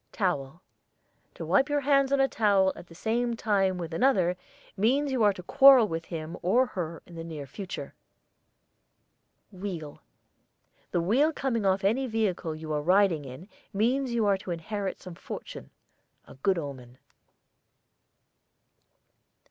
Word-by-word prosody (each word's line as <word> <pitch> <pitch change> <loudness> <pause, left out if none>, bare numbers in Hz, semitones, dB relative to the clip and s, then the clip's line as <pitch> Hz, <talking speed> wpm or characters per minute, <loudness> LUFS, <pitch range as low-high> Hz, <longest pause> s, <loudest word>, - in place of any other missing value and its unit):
TOWEL. 170 -5 -2 0.7
To - - -6
wipe 270 - +2
your 290 0 +1
hands 275 -1 +3
on 280 - +2
a 270 - +4
towel 200 -6 +2
at 175 - -12
the 165 - -15
same 235 +5 -1
time 195 -5 +1
with 170 -2 -6
another, 185 -5 +2 0.4
means 265 +8 +1
you 255 -3 0
are 210 -1 +5
to 180 - -10
quarrel 270 +1 +7
with 165 -3 -4
him 165 0 -6
or 235 +9 +3
her 170 -8 -6
in 175 - -15
the 165 -1 -7
near 155 -4 -7
future. 185 +7 -7 1.6
WHEEL. 180 -6 -7 0.9
The 175 - 0
wheel 255 - +3
coming 240 -9 -1
off 190 +1 +1
any 240 +7 +1
vehicle 195 -8 -1
you 155 0 -6
are 150 - 0
riding 180 -2 +3
in 130 +8 -10 0.3
means 245 +6 +1
you 230 -2 +1
are 200 -2 +2
to 190 - -10
inherit 190 +4 -4
some 185 - -10
fortune, - - -9 0.6
a - - -14
good 185 +8 0
omen. 130 -5 -7
195 Hz, 150 wpm, -28 LUFS, 165-235 Hz, 1.6 s, quarrel